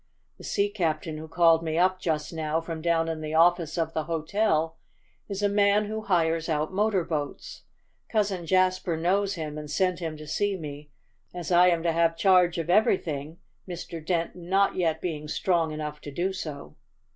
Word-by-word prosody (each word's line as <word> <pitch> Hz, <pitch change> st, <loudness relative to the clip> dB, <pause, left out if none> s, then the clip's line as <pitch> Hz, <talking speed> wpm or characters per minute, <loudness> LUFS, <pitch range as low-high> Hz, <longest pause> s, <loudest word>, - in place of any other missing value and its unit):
The -, -, -12 dB
sea 200 Hz, 0 st, +1 dB
captain 160 Hz, -5 st, -2 dB
who 160 Hz, -, -8 dB
called 165 Hz, 0 st, +4 dB
me 160 Hz, -1 st, -2 dB
up 185 Hz, +1 st, +3 dB
just 160 Hz, -2 st, -2 dB
now 160 Hz, 0 st, -1 dB
from 165 Hz, -1 st, -6 dB
down 165 Hz, 0 st, +1 dB
in 160 Hz, -1 st, -3 dB
the 155 Hz, 0 st, -4 dB
office 170 Hz, -1 st, +3 dB
of 165 Hz, -1 st, -1 dB
the 155 Hz, -1 st, -2 dB
hotel 165 Hz, 0 st, 0 dB, 0.5 s
is 200 Hz, 0 st, -4 dB
a -, -, +5 dB
man 205 Hz, +1 st, +3 dB
who 220 Hz, +1 st, -4 dB
hires 165 Hz, -4 st, +1 dB
out 155 Hz, +2 st, -1 dB
motor 200 Hz, -2 st, +1 dB
boats. 145 Hz, -3 st, -5 dB, 0.4 s
Cousin 200 Hz, -6 st, 0 dB
Jasper 185 Hz, -2 st, +2 dB
knows 195 Hz, +4 st, +1 dB
him, 155 Hz, -2 st, -5 dB
and 150 Hz, -1 st, -8 dB
sent 185 Hz, +3 st, +1 dB
him 160 Hz, -3 st, -4 dB
to 155 Hz, -, -9 dB
see 200 Hz, +6 st, -1 dB
me, 150 Hz, -2 st, -8 dB, 0.5 s
as 175 Hz, -1 st, -5 dB
I 175 Hz, +1 st, +6 dB
am 170 Hz, -2 st, +2 dB
to 170 Hz, -, +2 dB
have 165 Hz, 0 st, +2 dB
charge 180 Hz, -2 st, +4 dB
of 165 Hz, -1 st, -2 dB
everything, 165 Hz, -6 st, +1 dB, 0.3 s
Mr. 170 Hz, -2 st, -7 dB
Dent 170 Hz, 0 st, -1 dB
not 190 Hz, +3 st, +1 dB
yet 160 Hz, -3 st, 0 dB
being 155 Hz, -4 st, -4 dB
strong 165 Hz, 0 st, 0 dB
enough 150 Hz, -1 st, -5 dB
to -, -, -8 dB
do 180 Hz, +6 st, -1 dB
so." 145 Hz, -, -7 dB
165 Hz, 185 wpm, -27 LUFS, 155-185 Hz, 0.5 s, I